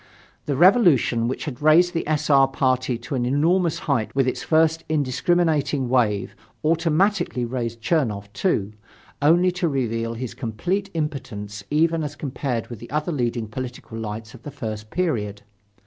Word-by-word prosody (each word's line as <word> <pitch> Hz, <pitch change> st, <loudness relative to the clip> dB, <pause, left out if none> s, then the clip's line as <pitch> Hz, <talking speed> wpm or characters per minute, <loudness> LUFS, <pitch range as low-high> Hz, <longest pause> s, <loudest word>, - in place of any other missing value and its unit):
The 145 Hz, -, 0 dB
Revolution 155 Hz, -, +4 dB
which 130 Hz, -, -3 dB
had 140 Hz, -5 st, -6 dB
raised 170 Hz, +4 st, +5 dB
the 165 Hz, -, -2 dB
S. 155 Hz, -1 st, 0 dB
R. 135 Hz, -1 st, +6 dB
party 130 Hz, -2 st, 0 dB
to 120 Hz, +5 st, -8 dB
an 125 Hz, -2 st, 0 dB
enormous 160 Hz, +6 st, +2 dB
height 130 Hz, -6 st, 0 dB
with 135 Hz, -1 st, +2 dB
its 130 Hz, -, -1 dB
first 160 Hz, 0 st, +2 dB
indiscriminating 150 Hz, -1 st, +1 dB
wave, 110 Hz, -6 st, +1 dB, 0.3 s
automatically 165 Hz, -, +1 dB
raised 115 Hz, -1 st, -4 dB
Chernoff, 110 Hz, -, 0 dB
too, 105 Hz, -, 0 dB, 0.5 s
only 175 Hz, +5 st, +4 dB
to 180 Hz, -1 st, -1 dB
reveal 115 Hz, -4 st, -1 dB
his 125 Hz, 0 st, -5 dB
complete 175 Hz, -, -2 dB
impotence 110 Hz, -10 st, -4 dB
even 160 Hz, +2 st, +2 dB
as 145 Hz, -1 st, -5 dB
compared 135 Hz, -4 st, -3 dB
with 120 Hz, -4 st, -8 dB
the 120 Hz, -, -10 dB
other 150 Hz, +4 st, -1 dB
leading 120 Hz, -5 st, -1 dB
political 125 Hz, 0 st, -7 dB
lights 110 Hz, 0 st, -6 dB
of 120 Hz, -, -13 dB
the 145 Hz, -, -7 dB
first 110 Hz, -6 st, -6 dB
period. 105 Hz, -, -2 dB
135 Hz, 155 wpm, -23 LUFS, 115-160 Hz, 0.5 s, R